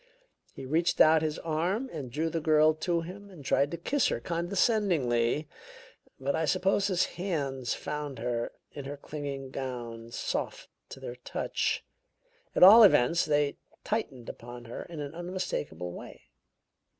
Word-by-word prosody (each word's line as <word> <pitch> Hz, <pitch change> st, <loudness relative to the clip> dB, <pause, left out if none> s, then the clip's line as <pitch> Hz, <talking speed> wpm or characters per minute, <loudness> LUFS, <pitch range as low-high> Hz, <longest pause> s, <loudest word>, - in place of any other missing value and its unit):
He -, -, -7 dB
reached 165 Hz, +6 st, +1 dB
out 155 Hz, 0 st, +7 dB
his 155 Hz, -1 st, -1 dB
arms 180 Hz, +11 st, -1 dB
and 140 Hz, -6 st, -6 dB
drew 160 Hz, +5 st, -1 dB
the 165 Hz, -, -1 dB
girl 155 Hz, 0 st, +5 dB
to 170 Hz, +2 st, -1 dB
him 195 Hz, +4 st, -9 dB
and 165 Hz, -8 st, -13 dB
tried 140 Hz, +2 st, +2 dB
to 170 Hz, -, -4 dB
kiss 265 Hz, -, +1 dB
her -, -, -1 dB
condescendingly; 170 Hz, -, +1 dB, 0.7 s
but 135 Hz, +1 st, -1 dB
I 160 Hz, 0 st, +1 dB
suppose 195 Hz, +5 st, +2 dB
his 185 Hz, -3 st, +2 dB
hands 140 Hz, -9 st, -2 dB
found 150 Hz, -3 st, -5 dB
her, 120 Hz, 0 st, -2 dB, 0.2 s
in 140 Hz, -2 st, -8 dB
her 145 Hz, +1 st, -6 dB
clinging 140 Hz, -2 st, -6 dB
gown, 120 Hz, -4 st, -5 dB
soft -, -, -3 dB, 0.2 s
to -, -, -9 dB
their 120 Hz, -, -7 dB
touch. 125 Hz, -, -2 dB, 0.7 s
At -, -, +5 dB
all 210 Hz, +5 st, +11 dB
events, 170 Hz, -, +5 dB
they 145 Hz, -1 st, +1 dB, 0.3 s
tightened 135 Hz, -, -3 dB
upon 120 Hz, 0 st, -9 dB
her 115 Hz, -, -6 dB
in 165 Hz, -4 st, -7 dB
an 145 Hz, +1 st, -6 dB
unmistakable 175 Hz, -, -4 dB
way. -, -, -10 dB
155 Hz, 150 wpm, -29 LUFS, 130-175 Hz, 0.7 s, all